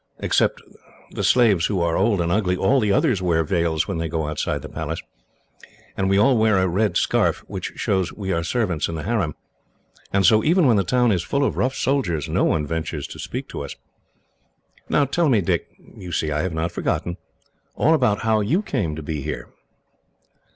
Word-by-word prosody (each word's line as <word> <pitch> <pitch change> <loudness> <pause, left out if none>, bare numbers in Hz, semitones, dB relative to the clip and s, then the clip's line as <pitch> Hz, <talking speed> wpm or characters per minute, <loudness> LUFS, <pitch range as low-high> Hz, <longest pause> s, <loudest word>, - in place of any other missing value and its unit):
Except - - +1 0.5
the - - -4
slaves 105 -9 +4
who 100 -3 -1
are 85 -1 +1
old 100 -1 +2
and 85 0 -1
ugly, 90 -2 +1
all 130 +9 +3
the 105 -4 +1
others 115 - +2
wear 85 -3 +2
veils 85 -2 0
when 80 - -3
they 80 - -1
go 80 -1 -2
outside 75 0 -2
the - - -6
Palace, - - -4 1.0
and 95 -1 0
we 95 - +3
all 125 +6 +4
wear 110 -2 +3
a 95 0 +2
red 100 +4 +1
scarf, - - +1
which - - -5
shows 95 -3 0
we 95 -3 -5
are 85 0 -1
servants 90 -6 -1
in 85 - -5
the 75 - -5
harem; 95 -8 -1 0.8
and 100 -1 +2
so, 110 +2 +5
even 170 +2 +3
when 120 -5 +4
the 100 - +2
town 125 +4 +2
is 90 -4 +1
full 140 +7 -1
of - - 0
rough 130 +1 0
soldiers, 90 - 0
no - - +1
one 75 - +1
ventures 80 -1 -3
to - - -10
speak - - -5
to - - -6
us. 70 - -7 1.1
"Now 145 - +3
tell 155 +4 +1
me, 115 -5 +4
Dick 90 - -1
you 90 -2 -12
see 80 -2 -1
I 75 +1 0
have 95 +1 -2
not 85 +2 -1
forgotten 85 +1 -2 0.6
all 160 - +3
about 125 -9 +2
how 110 -1 +2
you 160 - +1
came 100 - -2
to 80 - -7
be 75 -1 -4
here." - - -5
95 Hz, 205 wpm, -22 LUFS, 85-115 Hz, 1.1 s, so